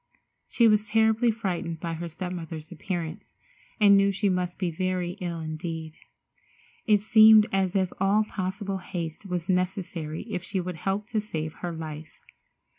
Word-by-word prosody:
She 235 - +4
was 210 -1 +3
terribly 220 +2 +3
frightened 180 -7 -2
by 170 -1 -3
her 170 +1 -5
step 180 +2 -5
mother's 165 -2 -7
appearance, 170 -2 -5 0.4
and 200 -2 +7
knew 200 0 +4
she 200 +1 0
must 180 -1 -1
be 180 -3 -1
very 185 +1 -1
ill 170 -2 -3
indeed. 160 0 -5 0.9
It 210 -2 +5
seemed 215 0 +7
as 190 0 0
if 190 -2 +1
all 200 +3 +3
possible 195 -1 -4
haste 175 0 -6
was 180 -2 -3
necessary 180 -4 -2
if 210 -5 -4
she 190 +2 -3
would 180 -1 -4
help 195 +5 -2
to 220 -3 0
save 160 -7 -4
her 175 - -3
life. 160 -1 -8
185 Hz, 160 wpm, -27 LUFS, 165-200 Hz, 0.9 s, and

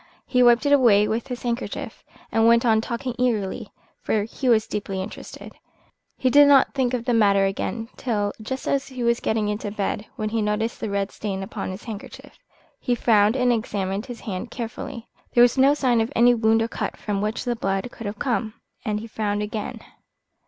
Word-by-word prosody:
He 250 - +2
wiped 240 +2 +5
it 285 - +4
away 215 -7 +5
with 225 +4 -2
his 250 -2 -6
handkerchief, 240 0 -4 0.3
and 225 0 +3
went 235 +1 +5
on 220 -2 +4
talking 240 +2 -4
eagerly, 220 -6 -1 0.3
for 215 -2 0
he 250 +4 -3
was 220 -2 +4
deeply 195 -2 -4
interested. 190 +3 -8 0.6
He 255 - +1
did 290 +1 +7
not 280 -2 +5
think 255 -2 0
of 235 -1 -4
the 245 - +1
matter 200 -3 +4
again 225 +3 -3
till 205 -5 -1
just 260 +5 -5
as 275 -1 0
he 255 -2 -5
was 235 0 +2
getting 220 -1 0
into 210 0 -3
bed, 205 0 -3
when 215 0 -2
he 225 0 -1
noticed 210 +2 -1
a 220 - -2
red 200 0 -1
stain 195 -2 -4
upon 190 - -5
his 190 +3 -7
handkerchief. 220 -3 -9 0.4
He 245 - 0
frowned 215 -1 +3
and 250 -2 +3
examined 205 -1 -2
his 245 -2 -8
hand 195 +3 -5
carefully. 235 +1 -6 0.3
There 240 - +8
was 245 - +4
no 275 +2 +5
sign 245 -5 +2
of 225 +4 -2
any 240 +1 +6
wound 225 -1 +3
or - - -1
cut - - -4
from 205 -2 -3
which 215 +1 -2
the 240 -1 0
blood 195 -1 -1
could 225 - -7
have 205 +1 -5
come, 230 -4 -1 0.3
and 210 -3 -1
he - - -7
frowned 210 -2 -2
again. 210 0 -5
225 Hz, 200 wpm, -23 LUFS, 210-245 Hz, 0.6 s, There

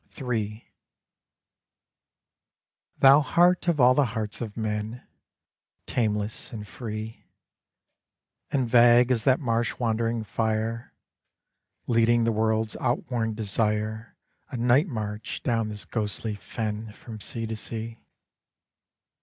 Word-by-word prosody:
III 110 -4 -3 2.3
Thou 135 +2 +7
heart 175 +5 +3
of 170 -4 +2
all 125 0 +7
the 140 +2 +3
hearts 105 +1 -4
of 110 -2 -6
men, 110 +2 -3 0.8
Tameless 105 -2 -1
and 105 -3 -7
free, 110 0 -7 1.2
And 130 -3 0
vague 120 +1 +6
as 115 -4 +1
that 130 -1 +4
marsh 115 -3 -1
wandering 115 -1 0
fire, 110 +2 -2 0.9
Leading 115 0 +3
the 115 - +2
world's 110 0 0
outworn 120 -2 -1
desire 110 +1 -1 0.3
A - - -5
night 125 +8 +3
march 105 - -5
down 115 -3 0
this 105 -1 -6
ghostly 110 0 -2
fen 105 +1 -5
From 110 -1 -10
sea 115 +2 -3
to 110 0 -4
sea! 115 +1 -6
115 Hz, 110 wpm, -26 LUFS, 110-120 Hz, 2.3 s, Thou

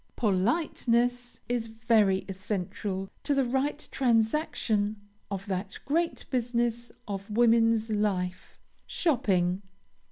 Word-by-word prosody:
Politeness 245 - +1
is 240 -2 -1
very 220 -4 +2
essential 195 0 -3 0.2
to 285 - +1
the 270 -1 +3
right 270 +4 -1
transaction 225 -4 +1 0.3
of 195 -1 -4
that 190 0 -3
great 330 +4 0
business 240 -1 0 0.2
of 200 0 -5
woman's 225 0 +3
life, 190 -4 -1 0.3
shopping. 190 - +1
225 Hz, 95 wpm, -28 LUFS, 200-245 Hz, 0.3 s, the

